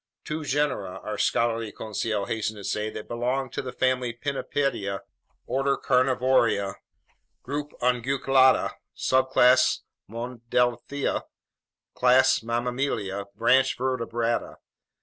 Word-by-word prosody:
"Two 155 Hz, +1 st, -4 dB
genera," 140 Hz, -10 st, -1 dB
our 105 Hz, -, -4 dB
scholarly 115 Hz, -2 st, +1 dB
Conseil 110 Hz, -1 st, -3 dB
hastened 110 Hz, 0 st, -2 dB
to 100 Hz, -, -9 dB
say, 105 Hz, +2 st, -2 dB
"that 110 Hz, -, -8 dB
belong 125 Hz, +2 st, -2 dB
to -, -, -3 dB
the 130 Hz, -, -6 dB
family 130 Hz, -1 st, 0 dB
Pinnipedia, 125 Hz, -6 st, -2 dB, 0.4 s
order 135 Hz, +1 st, 0 dB
Carnivora, 125 Hz, -6 st, +2 dB, 0.7 s
group 145 Hz, +2 st, -4 dB
Unguiculata, 130 Hz, +1 st, +3 dB, 0.3 s
subclass 130 Hz, -1 st, +4 dB, 0.3 s
Monodelphia, 120 Hz, +3 st, -1 dB, 0.7 s
class 130 Hz, +1 st, +4 dB
Mammalia, 115 Hz, -4 st, -2 dB
branch 130 Hz, +5 st, +3 dB
Vertebrata." 120 Hz, -2 st, -1 dB
125 Hz, 95 wpm, -26 LUFS, 115-130 Hz, 0.7 s, subclass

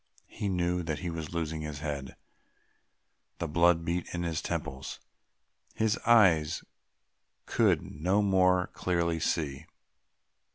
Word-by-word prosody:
He 100 Hz, -, -3 dB
knew 90 Hz, -1 st, 0 dB
that 80 Hz, -3 st, -3 dB
he 90 Hz, -2 st, -3 dB
was 80 Hz, -2 st, -5 dB
losing 80 Hz, -2 st, -3 dB
his 75 Hz, -1 st, -5 dB
head, 70 Hz, -3 st, -4 dB, 1.2 s
the 85 Hz, -, -3 dB
blood 85 Hz, +1 st, +3 dB
beat 85 Hz, +1 st, -1 dB
in 85 Hz, -, -2 dB
his 80 Hz, -2 st, -2 dB
temples, 65 Hz, +1 st, -4 dB, 0.8 s
his 110 Hz, -1 st, +2 dB
eyes 90 Hz, -10 st, +5 dB, 0.8 s
could -, -, +2 dB
no 90 Hz, +8 st, 0 dB
more 90 Hz, -2 st, +3 dB
clearly 85 Hz, -2 st, 0 dB
see.... 75 Hz, -2 st, -2 dB
85 Hz, 120 wpm, -30 LUFS, 80-90 Hz, 1.2 s, eyes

